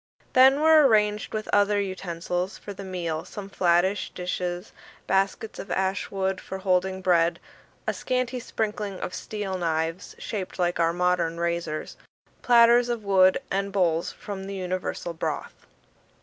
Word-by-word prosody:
Then 265 +3 +6
were 315 -2 +7
arranged 210 -2 +2
with 215 -1 -4
other 205 0 +4
utensils 180 -1 -3
for 205 - -8
the 195 - -8
meal 170 -4 -3
some 200 -1 -8
flattish 185 +2 +2
dishes, 180 +1 -4 0.3
baskets 195 +3 0
of 195 - -7
ash 190 +1 -1
wood 190 -1 -2
for 190 - -6
holding 190 0 0
bread, 170 -2 +3 0.5
a - - 0
scanty 255 -1 -2
sprinkling 210 -4 -3
of 180 - -5
steel 195 -2 -4
knives 165 +1 -2
shaped 195 -4 -5
like 175 -1 0
our 165 0 +3
modern 175 -1 0
razors, 170 -2 -3 0.4
platters 240 0 +5
of 235 -3 -2
wood, 190 -2 +5
and 195 +1 -1
bowls 170 -4 +1
for 205 - -7
the 195 +1 -6
universal 185 -2 -3
broth. 160 - -5
190 Hz, 145 wpm, -26 LUFS, 175-210 Hz, 0.5 s, were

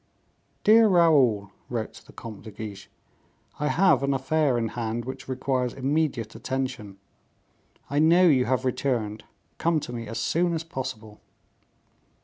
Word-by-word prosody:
"Dear 225 +1 +7
Raoul," 140 - +4 0.2
wrote 115 -3 -3
the - - -14
Comte 110 -4 -9
de 110 - -10
Guiche, 105 -2 -8 0.7
"I 150 - 0
have 185 +2 +4
an 140 0 +1
affair 135 0 +1
in 115 -1 -1
hand 115 0 -3
which 130 +1 -7
requires 130 -1 -1
immediate 135 -5 -1
attention; 120 -4 -4 0.9
I 145 - 0
know 165 +4 +5
you 135 -7 +4
have 130 0 0
returned; 115 -5 -1 0.3
come 165 -1 +2
to 125 - -7
me 115 -2 -5
as 115 - -5
soon 175 +1 +1
as 160 - -3
possible." 125 -8 -7
130 Hz, 140 wpm, -26 LUFS, 115-150 Hz, 0.9 s, Dear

